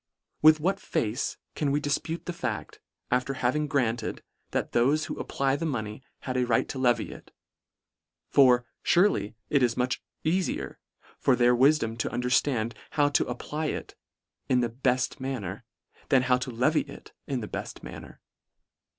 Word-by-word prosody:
With 155 0 +7
what 190 +5 0
face 115 +5 -2 0.2
can 150 - -1
we 145 +1 +2
difpute 155 +3 -2
the 175 - -3
fact, 125 -10 -4 0.3
after 125 +2 +1
having 140 +5 0
granted, 120 -5 -1 0.3
that - - -2
thofe 140 +6 +3
who - - -5
apply 135 0 0
the 165 - -3
money, 110 -4 -3 0.2
had 130 -1 -3
a 125 - +2
right 115 - +2
to 130 - -4
levy 125 -2 +2
it; - - -12 1.0
for, 125 -3 +5 0.2
furely, 145 - +3 0.2
it 140 - +4
is 120 -2 +2
much 125 0 0 0.2
eafier 180 +3 -1 0.4
for 130 - +4
their 125 0 +4
wifdom 120 -4 +3
to - - 0
underftand 125 -1 +1 0.2
how 145 -1 +5
to 145 - +2
apply 150 +5 -3
it - - -4 0.6
in 125 -1 +4
the 120 - 0
belt 130 +2 0
manner, 115 -6 -4 0.4
than 135 -3 +5
how 125 -1 +3
to 130 +1 -4
levy 125 +7 +2
it 140 - -11
in 135 -4 -2
the 105 - -5
befl: - - -6
manner. - - -10
130 Hz, 160 wpm, -28 LUFS, 120-145 Hz, 1.0 s, With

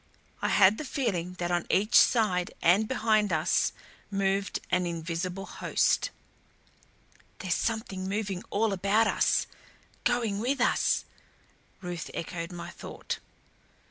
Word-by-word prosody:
I - - +1
had 200 +1 +5
the - - -3
feeling 195 - -2
that 175 -1 -2
on 175 -1 0
each 210 +5 +1
side 185 -9 +4
and 195 +6 +4
behind 215 -5 +2
us 155 -1 +2 0.4
moved 195 0 0
an 180 -1 +2
invisible 170 +3 -3
host. - - +1 1.3
"There's 185 -3 -1
something 195 -4 -2
moving 195 -2 -2
all 210 0 +1
about 200 +4 +2
us - - +2 0.6
going 235 -5 +1
with 255 +5 0
us," 245 - +2 0.8
Ruth 175 -2 -5
echoed 170 +1 -5
my 170 0 -7
thought. - - -6
195 Hz, 120 wpm, -28 LUFS, 175-220 Hz, 1.3 s, had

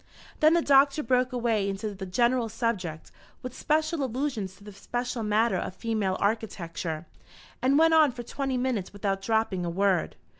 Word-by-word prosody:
Then 310 +2 +5
the 340 - +2
Doctor 280 +1 +4
broke 255 -1 +1
away 230 -5 0
into 205 +2 -4
the 190 -1 -7
general 235 +4 +1
subject, 205 -9 -3 0.3
with 255 0 -6
special 310 0 0
allusions 250 -7 -3
to 200 - -18
the 205 0 -11
special 240 +4 -4
matter 220 +2 +2
of 185 - -4
female 215 -5 -1
architecture, 175 -6 -2 0.6
and 265 +2 +3
went 325 +1 +5
on 310 -3 +6
for 240 0 -8
twenty 270 +1 -3
minutes 245 -8 -2
without 195 -1 -2
dropping 220 -3 0
a 170 - -2
word. 190 0 +1
225 Hz, 165 wpm, -27 LUFS, 195-255 Hz, 0.6 s, on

